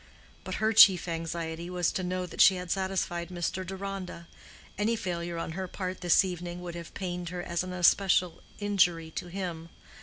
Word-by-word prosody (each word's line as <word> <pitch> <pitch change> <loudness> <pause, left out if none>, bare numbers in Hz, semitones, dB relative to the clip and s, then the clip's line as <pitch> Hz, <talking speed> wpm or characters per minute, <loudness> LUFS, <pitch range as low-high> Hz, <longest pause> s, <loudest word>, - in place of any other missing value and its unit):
But - - -4
her 220 +1 +1
chief 190 -5 +8
anxiety 165 0 -4
was 180 -1 0
to - - -2
know 180 0 -2
that 180 - -2
she 190 - +8
had 180 -1 -5
satisfied 190 -3 -1
Mr. 180 +1 -3
Deronda: 190 -2 -6 0.5
any 215 +3 +1
failure 175 -5 -4
on 165 - -4
her 185 +3 -4
part 185 0 -5
this 175 +1 +4
evening 175 -1 -5
would 175 -1 -6
have 170 -1 -9
pained 180 -2 -4
her 180 0 -5
as 170 -1 -1
an 185 0 -5
especial 180 0 +3 0.2
injury 175 -6 +1
to 175 - -5
him. 175 -3 -5
180 Hz, 180 wpm, -29 LUFS, 170-190 Hz, 0.5 s, chief